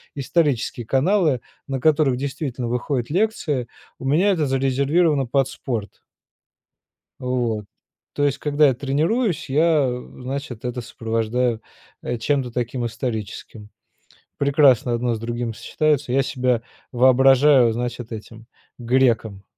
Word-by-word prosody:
исторические 140 -5 0
каналы, 150 - +2 0.3
на 135 -1 -2
которых 145 -2 +3
действительно 135 -2 -4
выходят 125 +1 -2
лекции, 165 - 0 0.3
у - - -8
меня 165 +9 +3
это 165 -6 +1
зарезервировано 135 +3 +2
под 135 +2 +1
спорт. 115 -6 -5 1.2
Вот. 120 -5 -1 0.5
То 145 - 0
есть 140 -2 +1
когда 150 0 +3
я 135 - +3
тренируюсь 155 - -1
я, 155 0 +3
э, 125 +1 -8
значит 130 -2 -5
это 125 0 -3
сопровождаю, 115 +1 -1 0.4
э, 120 - -3
чем-то 130 +1 -1
таким 120 0 -3
историческим. 110 -2 -5 0.7
Прекрасно 140 -4 +3
одно 120 0 0
с - - -4
другим 120 +1 -3
сочетаются. 145 0 0
Я 135 +1 +3
себя 125 -3 0 0.3
воображаю, 130 0 +5
значит, 120 0 -4
этим 110 +1 -9 0.3
греком 115 -5 +1
130 Hz, 120 wpm, -22 LUFS, 120-145 Hz, 1.2 s, воображаю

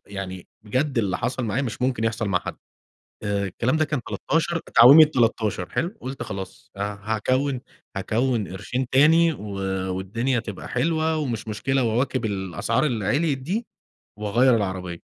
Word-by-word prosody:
يعني 95 -2 -6 0.2
بجد 130 +4 -1
اللي 100 -4 0
حصل 125 0 -2
معايا 115 +6 -1
مش 125 0 -4
ممكن 125 -3 0
يحصل 115 -2 -1
مع 90 -2 +2
حد! - - -7 0.7
آآ، 100 -1 0
الكلام 120 - 0
ده 155 - +2
كان 145 -4 -2
13، 165 +2 0 0.2
تعويمة 140 +7 +10
13 115 -9 0
حلو؟ 180 +7 -2
قلت 135 +1 -5
خلاص 95 -4 -8
ه - - -4
هاكوّن 125 +6 -1 0.3
هاكوّن 110 +2 0
قرشين 125 +8 -3
تاني 160 +5 +5
و 105 - -9 0.5
والدنيا 115 +7 -1
تبقى 105 -4 -7
حلوة 160 +4 +1
ومش 120 -8 -3
مشكلة 125 +6 0
وأواكب 125 +2 0
الأسعار 100 - -1
اللي 115 -8 -1
عليت 145 - +1
دي 190 - -3 0.5
وأغيّر 115 +4 +3
العربية. 95 -4 -3
120 Hz, 150 wpm, -24 LUFS, 105-135 Hz, 0.7 s, تعويمة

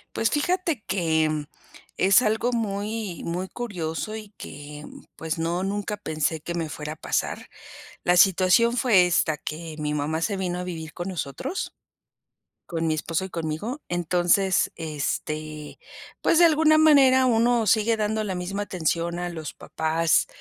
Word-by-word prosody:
Pues 225 - +2
fíjate 330 - 0
que, 160 -4 +1
mm, 150 -1 -2 0.5
es 195 +5 +5
algo 225 +2 +1
muy 210 -3 -3
muy 180 +3 -3
curioso 200 -3 -4
y 215 -2 -8
que, 145 +1 -9
mm, - - -13
pues 160 0 -4
no 170 +3 -1
nunca 205 +1 -2
pensé 155 -4 -2
que 170 - -5
me 165 -2 -2
fuera 150 0 -5
a - - -12
pasar. - - -2 0.6
La 180 0 +4
situación 195 +6 +5
fue 210 -8 +5
esta, 165 -3 +2
que 160 0 -6
mi 150 0 -2
mamá 150 +2 -1
se 200 +2 0
vino 180 -2 -2
a 180 - -4
vivir 160 -3 -6
con 175 +2 -5
nosotros, 185 - -4 0.9
con 165 -1 -2
mi 155 - +1
esposo 165 +3 -2
y 190 - -7
conmigo 170 - -4
entonces, 175 +2 +2
este 155 -1 -4 0.4
pues 330 - +4
de 345 - +8
alguna 310 -1 +4
manera 270 -4 +6
uno 235 -1 +3
sigue 220 +3 +3
dando 215 +1 0
la 190 -3 -3
misma 185 +3 -3
atención 170 -2 -1
a 175 0 -2
los 160 -3 -6
papás, 160 +1 +1
180 Hz, 160 wpm, -25 LUFS, 160-220 Hz, 0.9 s, de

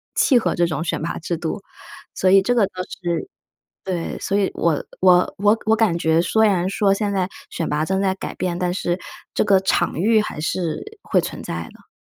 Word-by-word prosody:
契 255 -4 +4
合 - - -1
这 175 - +3
种 155 -2 -2
选 - - -2
拔 165 - -3
制 170 +1 -3
度， 175 +5 -4 0.5
所 185 - 0
以 195 0 +7
这 245 - +2
个 225 -4 +4
倒 - - -22 0.3
是 175 - -2 0.6
对， 180 -3 -3
所 200 - 0
以 195 - +2
我 165 -3 +1 0.2
我 180 -1 +4
我 210 +3 +3
我 220 - +5
感 210 -7 +2
觉 160 +1 +2
虽 220 +4 +3
然 185 -3 +1
说 195 -1 +2
现 205 0 -1
在 185 -2 0 0.2
选 165 - -3
拔 150 +1 0
正 190 +3 0
在 190 -1 +1
改 190 - -6
变， 180 -2 -2
但 180 -1 0
是 175 -1 -1 0.4
这 - - +2
个 200 -2 +5
场 190 - +1
域 215 +4 +4
还 150 - -6
是 180 - -3
会 - - +2
存 - - -6
在 - - -4
的。 - - -20
190 Hz, 230 characters per minute, -21 LUFS, 170-205 Hz, 0.6 s, 以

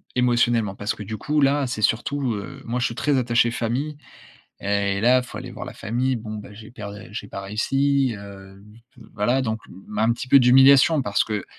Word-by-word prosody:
émotionnellement, 120 -4 +2
parce 105 +2 -2
que - - -11
du 110 +2 -6
coup, 150 +7 0
là, 140 +1 +3
c'est 125 -4 -4
surtout 125 +3 0
heu, 100 -3 -8
moi, 120 +2 -2
je 125 - 0
suis - - -2
très 145 -2 +1
attaché 120 -1 +2
famille 125 +6 -3 0.6
et 100 -1 0
là, 125 +3 +4
il - - -4
faut - - -9
aller - - -8
voir - - -8
la - - -8
famille. 125 +3 -1
Bon 110 -1 -7
bah, 105 -1 -9
j'ai 110 +1 -12
perd 105 -1 -9
j'ai 105 -2 -7
pas 100 - -6
réussi, 135 +5 0
heu, 100 -1 -12 0.5
voilà. 120 +5 +1
Donc, 110 -3 -2
mmh, 95 +3 -11
un 110 +2 +3
petit 120 +2 -4
peu 140 +1 +7
d'humiliation 135 +4 +6
parce 100 -4 +1
que, 105 -3 -4
115 Hz, 205 wpm, -23 LUFS, 105-130 Hz, 0.6 s, peu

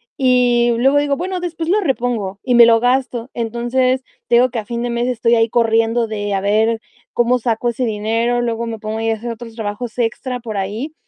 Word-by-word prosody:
y 245 -2 +3
luego 270 +4 +3
digo: 285 -1 0
"Bueno, 365 +1 -3
después 335 -2 -4
lo 405 +5 +2
repongo", 240 - -2
y 250 -2 +1
me 235 0 +9
lo 230 -1 +5
gasto. 250 0 0
Entonces, 240 +3 0 0.2
te 240 - +3
digo 250 +2 +5
que 235 - -2
a 215 - -7
fin 235 +1 -4
de 245 - -2
mes 235 +1 -1
estoy 235 -1 +2
ahí 225 0 +2
corriendo 230 0 +2
de 205 -2 -3
a 195 - +1
ver 220 +3 +2 0.3
cómo 240 +1 +2
saco 235 0 0
ese 240 +2 -2
dinero. 230 +2 0
Luego 235 -1 -2
me 225 -1 -4
pongo 215 +1 -4
a 225 0 0
hacer 230 +2 -5
otros 230 0 -9
trabajos 220 +2 -5
extra 245 +2 -2
por 220 -3 -6
ahí, 215 +10 -4
235 Hz, 210 wpm, -18 LUFS, 225-250 Hz, 0.3 s, me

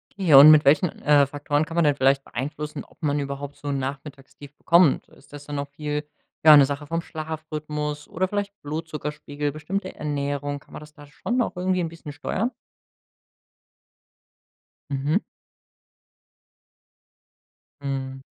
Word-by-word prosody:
Okay, 190 -6 +1
und 140 +3 +11
mit 155 -1 +6
welchen, 150 +5 +4
äh, 145 -1 +5
Faktoren 145 +2 -1
kann 165 - -8
man 170 - +3
denn 145 -2 +3
vielleicht 135 0 +2
beeinflussen, 150 +3 -5
ob - - -24
man 145 0 +1
überhaupt 140 0 -5
so 145 - -9
'n 140 - -1
Nachmittagstief 140 +1 -8
bekommt? 170 -4 +3
Ist 140 - -21
das 145 0 -10
dann 145 0 -5
noch 140 0 -3
viel 150 +1 -4 0.4
ja, 155 -1 +11
'ne 145 - +8
Sache 145 +1 -5
vom 165 +1 -2
Schlafrhythmus 155 -2 -5
oder 185 +3 -1
vielleicht 205 +1 -3
Blutzuckerspiegel, 150 -1 -4
bestimmte 180 +6 -4
Ernährung? 145 -1 -3
Kann - - -21
man - - -7
das 150 0 -14
da 145 0 -14
schon 235 - -4
noch 240 - 0
irgendwie 185 0 0
'n 165 - -2
bisschen 160 -3 -10
steuern? 220 - -2 2.4
Mhm. 140 +5 +1 2.6
Mhm. 135 -1 -4
150 Hz, 145 wpm, -24 LUFS, 140-155 Hz, 2.6 s, und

